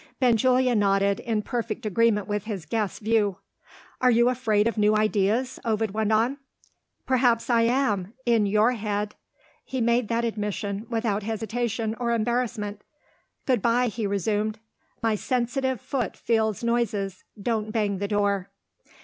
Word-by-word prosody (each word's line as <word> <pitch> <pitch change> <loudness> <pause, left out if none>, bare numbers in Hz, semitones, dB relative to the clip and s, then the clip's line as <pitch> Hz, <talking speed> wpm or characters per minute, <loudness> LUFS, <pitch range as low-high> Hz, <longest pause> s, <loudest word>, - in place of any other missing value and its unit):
Benjulia 250 +1 +3
nodded, 200 -2 +2
in 220 -2 -1
perfect 230 -2 -3
agreement 215 -1 +2
with 205 -1 -2
his 200 -7 -5
guest's 210 +4 -2
view. 215 -3 +1 0.6
"Are 255 - +5
you 235 0 +4
afraid 225 -4 +1
of 230 - -1
new 210 0 +3
ideas?" 215 +4 +1
Ovid 220 -2 0
went 215 +1 0
on. 235 +6 +2 0.7
"Perhaps 245 -2 +2
I 230 -1 +4
am 220 -6 0
in 230 -4 +3
your 215 +4 +3
head." 210 -3 -2 0.5
He 260 - -4
made 235 0 +2
that 235 +1 0
admission, 210 -1 -3
without 225 -3 0
hesitation 225 +1 -2
or 235 -1 0
embarrassment. 225 -3 -1 0.6
"Good 250 -5 +2
bye!" 240 +2 +2
he 220 0 -3
resumed. 210 +2 -1 0.5
"My 225 -1 +2
sensitive 255 +3 -1
foot 245 -4 -3
feels 220 -2 0
noises: 210 -5 -1 0.2
don't 220 0 -1
bang 205 -4 0
the 200 - -1
door." 200 -2 0
220 Hz, 140 wpm, -25 LUFS, 205-235 Hz, 0.7 s, Are